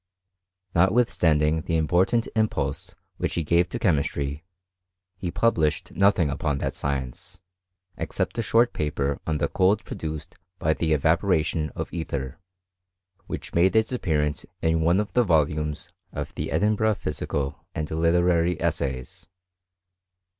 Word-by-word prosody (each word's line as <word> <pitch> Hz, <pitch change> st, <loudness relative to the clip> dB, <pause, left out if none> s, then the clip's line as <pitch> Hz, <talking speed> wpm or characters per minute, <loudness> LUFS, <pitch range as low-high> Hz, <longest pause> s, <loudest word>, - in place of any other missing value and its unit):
Notwithstanding 80 Hz, -6 st, +3 dB
the 80 Hz, +1 st, -1 dB
important 90 Hz, +9 st, +2 dB
impulse 110 Hz, -1 st, -1 dB, 0.2 s
which -, -, -2 dB
he 85 Hz, -, 0 dB
gave 85 Hz, +3 st, +2 dB
to 120 Hz, -, -3 dB
chemistry, 75 Hz, -6 st, 0 dB, 0.7 s
he 90 Hz, -, -4 dB
published 80 Hz, -8 st, +1 dB
nothing 95 Hz, -6 st, +3 dB
upon 75 Hz, -1 st, -1 dB
that -, -, -2 dB
cience, 70 Hz, +6 st, -4 dB, 0.6 s
except -, -, -2 dB
a -, -, +3 dB
short 115 Hz, +1 st, +3 dB
paper 70 Hz, -2 st, -1 dB
on 80 Hz, -1 st, +1 dB
the -, -, +1 dB
cold 95 Hz, +3 st, +2 dB
produced 75 Hz, -2 st, -6 dB, 0.2 s
by 80 Hz, -1 st, +1 dB
.he 80 Hz, 0 st, 0 dB
evaporation 80 Hz, 0 st, +1 dB
of -, -, -5 dB
ether, 70 Hz, -5 st, -4 dB, 0.9 s
which -, -, -6 dB
made 90 Hz, +5 st, +3 dB
its 110 Hz, +1 st, +3 dB
appearance 75 Hz, -11 st, 0 dB, 0.2 s
'n 80 Hz, 0 st, +2 dB
one 85 Hz, +4 st, +3 dB
of 105 Hz, -3 st, -3 dB
the 125 Hz, -, +4 dB
volumes 75 Hz, -4 st, 0 dB, 0.2 s
of -, -, -5 dB
the -, -, -4 dB
Edinburgh 105 Hz, +6 st, +2 dB
Physical 70 Hz, -3 st, -3 dB
and 75 Hz, -1 st, -3 dB
Literary 85 Hz, +1 st, +2 dB
Essays. 65 Hz, -3 st, -3 dB
80 Hz, 130 wpm, -25 LUFS, 75-95 Hz, 0.9 s, the